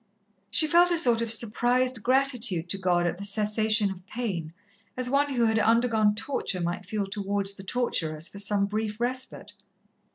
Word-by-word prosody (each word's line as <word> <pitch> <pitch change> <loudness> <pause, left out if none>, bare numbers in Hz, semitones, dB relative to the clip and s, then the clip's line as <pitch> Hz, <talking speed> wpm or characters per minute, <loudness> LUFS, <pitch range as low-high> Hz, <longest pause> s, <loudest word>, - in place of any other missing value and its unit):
She 310 - +3
felt 345 +3 +4
a 345 - +2
sort 240 -7 +4
of 230 -1 -1
surprised 240 +2 +1
gratitude 245 -8 +1
to 195 - -1
God 175 -2 +1
at 175 +1 -2
the - - -6
cessation 215 0 +2
of 185 -1 -10
pain, 190 -9 -4 0.5
as 255 0 -2
one 280 0 +1
who 235 -1 +2
had 220 0 +2
undergone 225 -2 +2
torture 215 -6 -2
might 175 +2 -4
feel 205 +1 -2
towards 200 0 -1
the 195 - -10
torturers 165 -8 -2
for 200 - -9
some 200 0 +1
brief 210 +1 -4
respite. 250 -4 -3
215 Hz, 170 wpm, -26 LUFS, 195-245 Hz, 0.5 s, felt